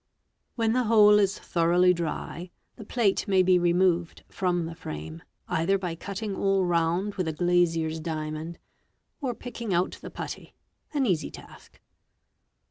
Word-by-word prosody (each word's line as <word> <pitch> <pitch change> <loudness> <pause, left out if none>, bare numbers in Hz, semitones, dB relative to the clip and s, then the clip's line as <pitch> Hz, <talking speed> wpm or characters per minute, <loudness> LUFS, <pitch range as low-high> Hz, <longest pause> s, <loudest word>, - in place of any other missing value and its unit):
When 225 -2 +1
the 250 0 +1
whole 210 -2 +6
is 200 0 +1
thoroughly 175 +1 +3
dry, 170 +1 -4 0.3
the - - -10
plate 225 -2 +1
may 190 -2 +4
be 180 0 +4
removed 175 -1 +1
from 175 -3 -1
the 165 - -6
frame, 80 - -7 0.3
either 190 +5 +1
by 180 -3 -4
cutting 200 +4 -5
all 195 -1 +1
round 175 +4 +1
with 185 -4 -2
a 160 - -1
glazier's 165 -1 +1
diamond, 155 +1 -4 0.6
or 260 -6 -2
picking 235 -4 -4
out 180 +2 0
the - - -7
putty—an 285 -3 -6
easy 180 -8 0
task. - - -14
180 Hz, 140 wpm, -27 LUFS, 165-200 Hz, 0.6 s, whole